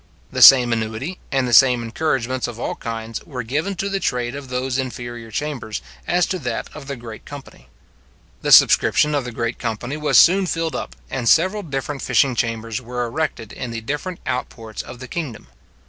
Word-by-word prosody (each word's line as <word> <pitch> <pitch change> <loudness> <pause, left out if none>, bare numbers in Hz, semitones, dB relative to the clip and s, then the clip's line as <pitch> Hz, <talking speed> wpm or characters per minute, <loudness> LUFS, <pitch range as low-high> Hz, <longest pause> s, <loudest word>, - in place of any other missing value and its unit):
The - - -2
same 125 -3 +9
annuity, 115 +10 -3
and 135 -2 +1
the 120 - -2
same 125 0 +6
encouragements 130 0 -1
of 120 -1 -8
all - - -2
kinds, 115 -1 -6
were 125 -5 -6
given 150 - -2
to 195 +2 -2
the 195 0 -1
trade 125 -7 -1
of 140 -2 -8
those 130 +1 -1
inferior 120 -3 -5
chambers 130 -3 -4 0.3
as 175 0 +3
to 185 - -3
that 120 -5 -4
of 150 -3 -9
the 140 - -4
great 115 -3 -10
company. 135 - -12 0.7
The - - -1
subscription 150 0 +6
of 140 -3 0
the 125 - -5
great 115 +1 -3
company 120 +4 -3
was 150 -1 +2
soon 190 +2 +6
filled 165 -1 -2
up, - - -5 0.2
and 115 - 0
several 185 +6 +3
different 140 -4 -4
fishing 135 -3 +2
chambers 115 -1 -2
were 125 0 -3
erected 120 -3 -3
in 125 - -5
the 115 -1 -5
different 150 +9 -4
out 125 - -2
ports 110 -2 -8
of 125 - -10
the 130 +1 -9
kingdom. 140 - -5
125 Hz, 195 wpm, -21 LUFS, 115-150 Hz, 0.7 s, same